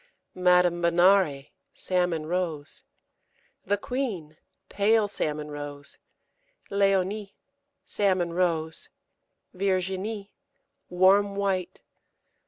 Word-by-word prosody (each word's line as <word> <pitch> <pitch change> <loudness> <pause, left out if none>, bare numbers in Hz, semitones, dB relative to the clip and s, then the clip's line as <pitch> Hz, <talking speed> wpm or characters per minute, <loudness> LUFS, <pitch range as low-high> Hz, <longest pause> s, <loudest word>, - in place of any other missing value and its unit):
Madame 180 -1 +3
Benare, 170 -4 +3 0.2
salmon 180 -4 0
rose. 165 -4 -3 0.8
The 205 +1 0
Queen, 205 - -4 0.3
pale 210 +1 +2
salmon 150 -6 -3
rose. 145 -1 -7 0.7
Léonie, 195 +1 +1 0.5
salmon 185 -4 0
rose. 165 -3 -1 0.6
Virginie, 195 +2 -2 0.6
warm 195 +3 +4
white. 195 -3 -2
185 Hz, 70 wpm, -26 LUFS, 170-200 Hz, 0.8 s, warm